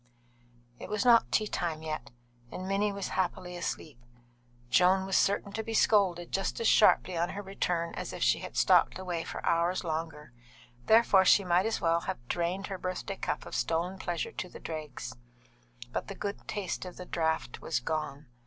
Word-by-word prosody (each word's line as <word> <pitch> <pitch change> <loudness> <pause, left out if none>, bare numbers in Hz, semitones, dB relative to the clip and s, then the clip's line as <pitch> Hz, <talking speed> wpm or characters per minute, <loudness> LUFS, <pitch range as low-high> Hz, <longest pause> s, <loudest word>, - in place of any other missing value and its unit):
It - - -8
was 210 +1 -1
not 235 -2 +5
tea 215 - +2
time 165 -6 -3
yet, 155 -4 -4 0.4
and 185 - -6
Minnie 200 +2 +1
was 200 -1 -4
happily 180 -1 -2
asleep; 155 -5 -5 0.7
Joan 185 +1 +4
was 190 - -1
certain 200 0 +2
to 220 +2 -3
be 225 0 -4
scolded 185 -6 +3
just 195 - -1
as 230 - +1
sharply 185 -3 +5
on 170 +1 0
her 205 +2 -5
return 175 -3 -2
as - - -5
if - - -3
she - - +3
had - - -7
stopped - - +4
away 180 -3 -3
for - - -6
hours 170 +3 +1
longer, 155 -4 -4 0.5
therefore 220 -4 +6
she 200 +2 +6
might 180 +3 +2
as 225 - -1
well 165 0 +3
have 120 -7 -6
drained 175 +5 -1
her 195 -2 -5
birthday 185 +2 -4
cup - - -3
of - - -10
stolen 175 +3 -1
pleasure 175 -3 -3
to 185 - -5
the - - -11
dregs; 150 -6 -6 0.8
but - - -3
the 195 - -6
good 200 +1 -5
taste 200 -4 -3
of 180 -1 -9
the 180 - -7
draught 160 -9 -1
was 160 - -1
gone. 155 -2 -3
180 Hz, 185 wpm, -30 LUFS, 165-195 Hz, 0.8 s, therefore